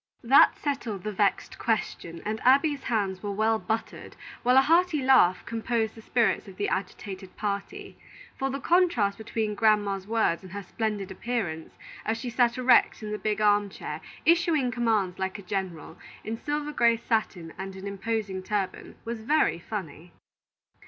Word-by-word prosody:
That 260 +4 +6
settled 240 -10 -3
the 215 - -3
vexed 200 0 0
question, 170 -6 -2
and 215 +1 -2
Abby's 280 +3 +4
hands 195 -5 -1
were 205 - -4
well 220 +2 +1
buttered, 225 +1 -4 0.3
while 250 +2 +4
a - - +9
hearty 335 +1 +3
laugh 220 -9 +4
composed 225 -1 -1
the 225 - -12
spirits 230 -1 +1
of 190 -1 -12
the 205 - -1
agitated 190 0 -5
party; 210 - -4 0.4
for 270 - -2
the 275 +1 -3
contrast 275 - +2
between 220 -1 -2
grandma's 205 -2 +2
words 220 -6 +1
and 185 -1 -12
her 200 0 -5
splendid 210 -1 -3
appearance, 190 -7 -4 0.3
as 225 +1 -1
she 245 -1 -5
sat 240 0 +2
erect 255 -3 +4
in 210 - -5
the 210 - -3
big 215 0 -1
arm 205 -1 +3
chair - - -7 0.2
issuing 325 -6 +3
commands 220 -6 0
like 190 +1 -2
a 200 - -10
general, 185 -4 -5 0.2
in 220 - -3
silver 295 +4 -3
gray 235 -5 +3
satin 215 -8 -2
and 190 0 -6
an 190 +1 -8
imposing 200 -1 -3
turban, 195 0 -3
was 230 -1 -4
very 265 - +2
funny. 175 -4 -7
215 Hz, 165 wpm, -27 LUFS, 195-245 Hz, 0.4 s, a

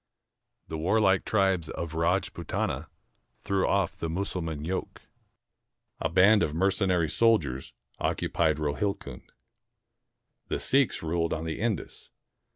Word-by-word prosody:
The 80 - -5
warlike 95 +2 +3
tribes 95 -6 +1
of 85 -2 -5
Rajpootana 85 +1 -1 0.5
threw 95 -1 0
off 100 -3 +1
the 80 - -4
IVIussulman 80 -4 -3
yoke. 95 +2 -4 1.0
A - - -1
band 100 +5 +5
of 75 - 0
mercenary 95 -2 +2
soldiers 105 - +1 0.3
occupied 80 -3 +1
Rohilcund. 75 +7 -3 1.2
The - - -2
Seiks 135 -8 +2
ruled 85 +1 0
on 80 0 -3
the 80 - -4
Indus. 110 -4 -3
90 Hz, 110 wpm, -28 LUFS, 80-100 Hz, 1.2 s, band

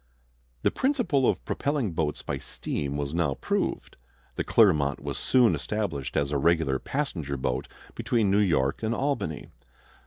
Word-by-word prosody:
The - - +3
principle 245 - +2
of - - -2
propelling 140 -8 -1
boats 80 -2 -2
by - - -3
steam 70 0 -3
was 70 0 -3
now 85 -5 +1
proved. - - -2 0.4
The - - -2
Clermont 75 -11 +3
was - - -4
soon 125 -3 +4
established 70 -12 -3
as 70 0 +1
a 70 - +1
regular 80 -4 +2
passenger 85 - -3
boat 65 0 -2 0.3
between 110 -5 +1
New 100 - +4
York 75 -9 +1
and 110 +1 0
Albany. 135 - -2
85 Hz, 150 wpm, -27 LUFS, 70-115 Hz, 0.4 s, soon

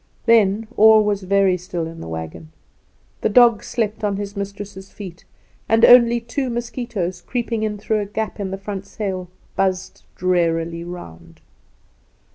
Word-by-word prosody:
Then 220 -2 +4
all 220 0 +7
was 205 -1 0
very 195 -1 +2
still 175 -2 -4
in 165 0 -8
the - - -7
wagon. 80 -1 -7 0.7
The - - +1
dog 235 -1 +5
slept 220 -2 -2
on 200 -2 0
his 200 0 -5
mistress' 200 -1 -7
feet, 180 -4 -10 0.4
and 225 +1 +6
only 240 -1 +7
two 245 +3 -3
mosquitoes, 235 -7 -4
creeping 235 -1 -3
in 215 -1 -2
through 215 +1 -1
a 205 - -2
gap 220 +1 -4
in 195 -2 -3
the 195 - -4
front 195 0 -6
sail, 190 -4 -4 0.3
buzzed 190 -1 -1
drearily 170 -2 0
round. 85 - -10
200 Hz, 150 wpm, -21 LUFS, 180-220 Hz, 0.7 s, all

